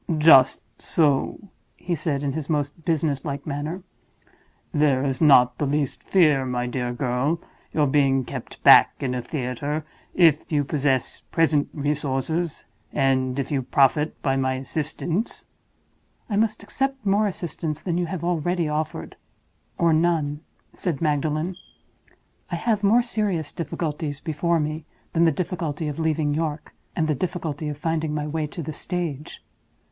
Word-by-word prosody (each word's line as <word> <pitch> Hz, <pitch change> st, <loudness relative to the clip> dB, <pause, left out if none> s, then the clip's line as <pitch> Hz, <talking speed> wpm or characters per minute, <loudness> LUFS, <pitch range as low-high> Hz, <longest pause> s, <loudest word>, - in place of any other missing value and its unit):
"Just 150 Hz, -4 st, +6 dB, 0.2 s
so," 150 Hz, +6 st, +1 dB, 0.3 s
he 175 Hz, -, -3 dB
said, 150 Hz, -3 st, -1 dB
in 140 Hz, -1 st, -1 dB
his 155 Hz, 0 st, -5 dB
most 150 Hz, +1 st, -2 dB
business 155 Hz, -4 st, 0 dB
like 140 Hz, -1 st, -4 dB
manner. 155 Hz, +5 st, -4 dB, 0.9 s
"There 145 Hz, -3 st, +2 dB
is 135 Hz, +1 st, -2 dB
not 125 Hz, -5 st, +6 dB
the 145 Hz, -, 0 dB
least 145 Hz, -1 st, -1 dB
fear, 155 Hz, -8 st, +3 dB
my 125 Hz, -1 st, -2 dB
dear 125 Hz, 0 st, -2 dB
girl, 125 Hz, +4 st, 0 dB
of 170 Hz, -, -4 dB, 0.3 s
your 150 Hz, -, +2 dB
being 135 Hz, -2 st, +2 dB
kept -, -, -8 dB
back -, -, +8 dB
in 130 Hz, -2 st, -2 dB
a 125 Hz, -, -2 dB
theater, 145 Hz, +3 st, -3 dB, 0.3 s
if 165 Hz, -4 st, +4 dB
you 145 Hz, -2 st, +2 dB
possess 135 Hz, -3 st, 0 dB
present 155 Hz, -3 st, +2 dB
resources, 150 Hz, +2 st, -1 dB, 0.3 s
and 130 Hz, -1 st, +1 dB
if 135 Hz, 0 st, -2 dB
you 140 Hz, -2 st, +1 dB
profit 145 Hz, +3 st, +2 dB
by 135 Hz, -1 st, +2 dB
my 130 Hz, -1 st, 0 dB
assistance." 160 Hz, -, -3 dB, 0.9 s
"I -, -, +1 dB
must 215 Hz, 0 st, +1 dB
accept 270 Hz, +3 st, -2 dB
more 205 Hz, +2 st, +3 dB
assistance 165 Hz, -4 st, -4 dB
than 175 Hz, -2 st, -1 dB
you 175 Hz, -, -1 dB
have 175 Hz, 0 st, -5 dB
already 175 Hz, 0 st, 0 dB
offered—or 155 Hz, +2 st, -3 dB
none," 155 Hz, -3 st, +1 dB, 0.3 s
said 165 Hz, -7 st, -2 dB
Magdalen. 155 Hz, +3 st, 0 dB, 0.9 s
"I 175 Hz, -, -2 dB
have 210 Hz, +3 st, 0 dB
more 225 Hz, +5 st, +5 dB
serious 205 Hz, -10 st, -1 dB
difficulties 150 Hz, -2 st, -4 dB
before 165 Hz, +2 st, 0 dB
me 155 Hz, +1 st, -2 dB, 0.3 s
than 170 Hz, 0 st, +4 dB
the 165 Hz, -, +5 dB
difficulty 160 Hz, -1 st, -3 dB
of 150 Hz, +1 st, -4 dB
leaving 155 Hz, -2 st, +1 dB
York, 155 Hz, -1 st, -3 dB, 0.2 s
and 160 Hz, -2 st, +1 dB
the 155 Hz, -, +2 dB
difficulty 160 Hz, -1 st, -3 dB
of 145 Hz, -, -5 dB
finding 160 Hz, -1 st, -1 dB
my 150 Hz, -1 st, -2 dB
way 155 Hz, 0 st, -2 dB
to 165 Hz, +3 st, -7 dB
the 155 Hz, -, -5 dB
stage." 160 Hz, -3 st, -5 dB
150 Hz, 150 wpm, -24 LUFS, 140-170 Hz, 0.9 s, back